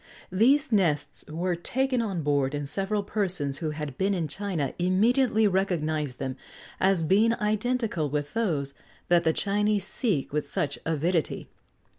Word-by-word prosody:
These 270 Hz, +10 st, +3 dB
nests 150 Hz, -9 st, +1 dB
were 175 Hz, +3 st, -1 dB
taken 255 Hz, +8 st, 0 dB
on 195 Hz, -8 st, -2 dB
board, 145 Hz, -1 st, +1 dB
and 145 Hz, -1 st, -3 dB
several 200 Hz, +5 st, 0 dB
persons 185 Hz, -10 st, -1 dB
who 160 Hz, -, -2 dB
had 150 Hz, -3 st, -6 dB
been 195 Hz, +1 st, +2 dB
in 165 Hz, -4 st, -1 dB
China 170 Hz, -5 st, -3 dB
immediately 220 Hz, +5 st, +3 dB
recognised 155 Hz, -8 st, -1 dB
them 130 Hz, 0 st, -4 dB, 0.4 s
as 190 Hz, -3 st, +3 dB
being 215 Hz, +7 st, +3 dB
identical 215 Hz, -, 0 dB
with 145 Hz, 0 st, -3 dB
those 160 Hz, -12 st, -1 dB, 0.4 s
that 175 Hz, -1 st, +4 dB
the 160 Hz, -, +3 dB
Chinese 205 Hz, +2 st, +1 dB
seek 190 Hz, -, -1 dB
with 150 Hz, 0 st, -1 dB
such 155 Hz, -7 st, -2 dB
avidity. 165 Hz, +1 st, -1 dB
185 Hz, 145 wpm, -27 LUFS, 150-210 Hz, 0.4 s, that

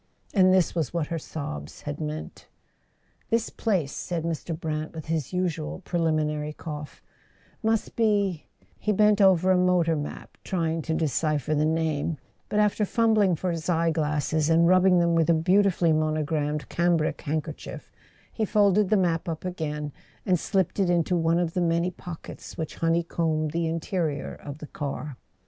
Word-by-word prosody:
And 185 Hz, -2 st, +5 dB
this 185 Hz, -2 st, +3 dB
was 165 Hz, -2 st, -2 dB
what 160 Hz, -3 st, -1 dB
her 165 Hz, -, -2 dB
sobs 75 Hz, -, -7 dB
had 145 Hz, +1 st, -5 dB
meant... 155 Hz, 0 st, -6 dB, 0.8 s
"This 230 Hz, 0 st, 0 dB
place," 185 Hz, -, 0 dB
said 170 Hz, +1 st, -3 dB
Mr. 165 Hz, 0 st, -3 dB
Brant, 155 Hz, 0 st, -3 dB
with 160 Hz, -, -6 dB
his 160 Hz, -4 st, -2 dB
usual 165 Hz, -, -2 dB
pre¬ 175 Hz, -, -1 dB
liminary 150 Hz, -2 st, 0 dB
cough, 150 Hz, -2 st, -7 dB, 0.6 s
"must 220 Hz, -1 st, 0 dB
be 205 Hz, -7 st, +1 dB
" -, -, -33 dB
Fie 210 Hz, -, +2 dB
bent 210 Hz, +1 st, +4 dB
over 190 Hz, -1 st, +5 dB
a 185 Hz, -, +4 dB
motor 180 Hz, -3 st, +3 dB
map, 145 Hz, -1 st, -7 dB
trying 165 Hz, -3 st, -1 dB
to 160 Hz, 0 st, -2 dB
decipher 155 Hz, -1 st, 0 dB
the 150 Hz, 0 st, +2 dB
name; 160 Hz, -1 st, 0 dB, 0.3 s
but 210 Hz, -, -1 dB
after 210 Hz, 0 st, +2 dB
fumbling 215 Hz, -3 st, +3 dB
for 180 Hz, +2 st, -2 dB
his 165 Hz, 0 st, -4 dB
eye 165 Hz, -1 st, +2 dB
glasses, 150 Hz, 0 st, 0 dB
and 165 Hz, +1 st, +5 dB
rubbing 185 Hz, 0 st, +5 dB
them 170 Hz, -1 st, +3 dB
with 165 Hz, -1 st, +2 dB
a -, -, +6 dB
beauti¬ 190 Hz, +5 st, +4 dB
fully 170 Hz, -2 st, +2 dB
monogrammed 155 Hz, -2 st, 0 dB
cambric 170 Hz, -3 st, +1 dB
handkerchief, 155 Hz, +1 st, -5 dB, 0.4 s
he 225 Hz, -, -1 dB
folded 205 Hz, -2 st, +3 dB
the 215 Hz, -, +4 dB
map 170 Hz, -3 st, 0 dB
up 160 Hz, +2 st, -5 dB
again 150 Hz, -4 st, -3 dB, 0.3 s
and 180 Hz, -3 st, +2 dB
slipped 190 Hz, +2 st, 0 dB
it 190 Hz, -3 st, +2 dB
into 175 Hz, 0 st, +2 dB
one 165 Hz, 0 st, +2 dB
of 170 Hz, -2 st, 0 dB
the 180 Hz, -, 0 dB
many 170 Hz, +1 st, +1 dB
pockets 175 Hz, -2 st, -9 dB
which 160 Hz, -2 st, -5 dB
honeycombed 165 Hz, -2 st, 0 dB
the 165 Hz, +1 st, 0 dB
interior 160 Hz, -2 st, -2 dB
of 145 Hz, 0 st, -9 dB
the 155 Hz, -, -8 dB
car. 145 Hz, -2 st, -5 dB
165 Hz, 170 wpm, -26 LUFS, 155-180 Hz, 0.8 s, a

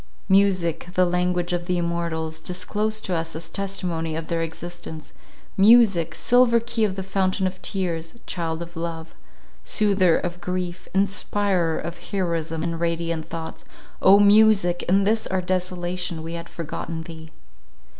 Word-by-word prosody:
Music—the 185 Hz, -2 st, +2 dB
language 180 Hz, 0 st, 0 dB
of 175 Hz, 0 st, -2 dB
the 180 Hz, -1 st, +1 dB
immortals, 170 Hz, -2 st, -2 dB
disclosed 210 Hz, +5 st, -2 dB
to 185 Hz, -, -2 dB
us 165 Hz, -1 st, -2 dB
as 165 Hz, +1 st, -6 dB
testimony 175 Hz, -5 st, -3 dB
of 160 Hz, 0 st, -5 dB
their 165 Hz, -1 st, 0 dB
existence—music, 175 Hz, +3 st, +1 dB
"silver 245 Hz, +2 st, +4 dB
key 230 Hz, -1 st, -2 dB
of 200 Hz, -3 st, +1 dB
the 190 Hz, -, -4 dB
fountain 190 Hz, 0 st, 0 dB
of 185 Hz, 0 st, -3 dB
tears," 170 Hz, -3 st, -3 dB
child 165 Hz, -1 st, -3 dB
of 170 Hz, 0 st, -13 dB
love, 165 Hz, -1 st, -5 dB, 0.5 s
soother 195 Hz, -5 st, +3 dB
of 175 Hz, 0 st, -4 dB
grief, 180 Hz, 0 st, -4 dB
inspirer 195 Hz, -3 st, +1 dB
of 170 Hz, 0 st, -6 dB
heroism 165 Hz, -4 st, -2 dB
and 165 Hz, -1 st, -2 dB
radiant 170 Hz, -1 st, -1 dB
thoughts, 165 Hz, -1 st, -7 dB, 0.4 s
O 195 Hz, +1 st, +7 dB
music, 205 Hz, -3 st, +5 dB
in 195 Hz, +2 st, +4 dB
this 220 Hz, +2 st, +1 dB
our 190 Hz, -, 0 dB
desolation, 180 Hz, -2 st, -2 dB
we 165 Hz, +1 st, -6 dB
had 170 Hz, 0 st, -6 dB
forgotten 165 Hz, 0 st, -5 dB
thee! 160 Hz, -1 st, -10 dB
175 Hz, 140 wpm, -23 LUFS, 165-195 Hz, 0.5 s, O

